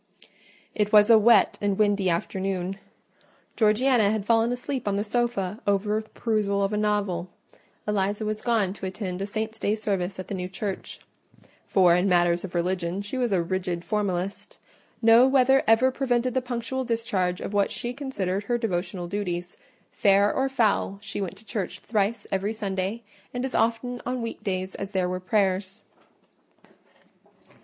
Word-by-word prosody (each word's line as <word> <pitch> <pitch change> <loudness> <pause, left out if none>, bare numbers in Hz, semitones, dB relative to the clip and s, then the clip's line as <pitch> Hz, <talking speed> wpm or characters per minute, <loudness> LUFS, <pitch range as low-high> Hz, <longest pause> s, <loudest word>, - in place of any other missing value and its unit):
It 210 -1 0
was 210 +1 +7
a 225 - +8
wet 215 -2 +4
and 200 -1 0
windy 205 -3 +2
afternoon: 190 +2 -2 0.8
Georgiana 220 0 +3
had 215 -1 -1
fallen 230 +1 +3
asleep 250 0 -4
on 200 - +1
the 205 - 0
sofa 215 -3 -1
over 205 +2 +1
the 220 - -18
perusal 205 -3 0
of 195 +2 -1
a - - +1
novel; 205 -4 0 0.6
Eliza 205 +1 0
was 215 0 -3
gone 220 -6 +1
to 195 - -6
attend 185 -1 -5
a 195 - -2
saint's 220 +1 -4
day 210 - +1
service 195 -3 -2
at 185 - -6
the - - -5
new 180 -1 -4
church—for 190 -2 -2
in 180 +2 +2
matters 175 -1 +3
of 185 -2 -7
religion 180 +2 -1
she 205 +6 -6
was 245 -3 0
a 180 -3 +2
rigid 180 -1 -3
formalist: 200 - -2 0.5
no 230 +3 +7
weather 265 0 +4
ever 230 +4 +5
prevented 250 -2 0
the 260 - +1
punctual 250 +1 -3
discharge 205 -7 -1
of - - -5
what 200 -1 +2
she 240 +1 -4
considered 205 -8 -3
her 240 +2 +1
devotional 180 -5 -3
duties; 180 -2 -3 0.4
fair 200 0 +3
or 270 0 0
foul, 215 -6 +1
she 200 0 -5
went 190 0 -4
to 215 - -17
church 205 -3 -4
thrice 215 0 -1
every 195 +2 -1
Sunday, 200 +1 -3 0.3
and 245 +1 -1
as 265 - -5
often 240 +2 0
on 250 -1 -3
week 230 - -6
days 185 -1 -2
as 195 +1 -6
there 185 -2 +1
were 185 0 -3
prayers. 190 0 0
205 Hz, 165 wpm, -26 LUFS, 190-230 Hz, 0.8 s, a